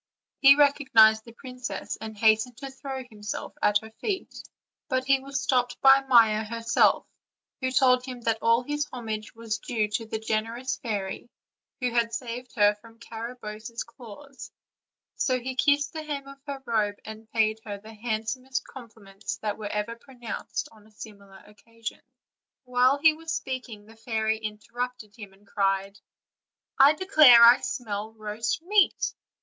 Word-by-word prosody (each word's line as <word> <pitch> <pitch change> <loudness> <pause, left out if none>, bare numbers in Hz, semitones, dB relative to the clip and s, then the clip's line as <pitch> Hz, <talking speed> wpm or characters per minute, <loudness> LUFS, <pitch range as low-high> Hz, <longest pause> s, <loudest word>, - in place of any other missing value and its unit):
He 275 0 +8
recognized 260 -7 +5
the 230 - -12
princess, 250 +1 -6
and 220 -1 -7
hastened 220 +2 +3
to 275 0 -7
throw 265 -1 -6
himself 210 -4 -7
at 210 0 +4
her 220 - -11
feet; 380 - -4 0.6
but 260 -1 0
he 270 0 +3
was 275 +1 -4
stopped 245 -2 0
by 270 0 +7
Maia 225 -4 +5
herself, 230 +1 +2 0.5
who 260 - -1
told 255 -1 +4
him 250 -2 -8
that 225 -1 0
all 230 +2 +3
his 295 +2 -2
homage 220 -4 -6
was 225 -1 -4
due 220 -3 -1
to 225 +2 -3
the 220 - -3
generous 225 +4 -2
fairy, 205 -1 -4 0.5
who 250 -2 -1
had 230 -1 +1
saved 250 0 -6
her 205 -2 +5
from 230 0 -17
Garabosse's 230 -1 -7
claws; 250 +3 -12 0.7
so 255 -2 +1
he 260 +2 -5
kissed 285 +2 +2
the 315 - -5
hem 290 -3 -5
of 275 0 -13
her 275 -1 -6
robe, 215 -3 0
and 220 0 -10
paid 220 -1 +1
her 205 -2 -6
the 215 +2 -13
handsomest 230 +4 -3
compliments 215 -5 -9
that 210 0 -2
were 210 - -4
ever 210 +2 -3
pronounced 240 -2 -6
on 215 -1 -19
a - - -23
similar 200 -3 -13
occasion. 225 +2 -9 0.6
While 250 +2 +3
he 315 +2 +5
was 325 +1 -7
speaking 250 -5 -6
the 225 +1 -16
fairy 220 -1 -1
interrupted 220 +1 -6
him, 205 -4 -10
and 195 +2 -24
cried: 195 0 -1 0.8
"I 275 +2 +8
declare 305 -9 +7
I 235 +1 +8
smell 215 -2 -4
roast 220 +7 -3
meat." 400 +1 +2
230 Hz, 155 wpm, -26 LUFS, 215-260 Hz, 0.8 s, He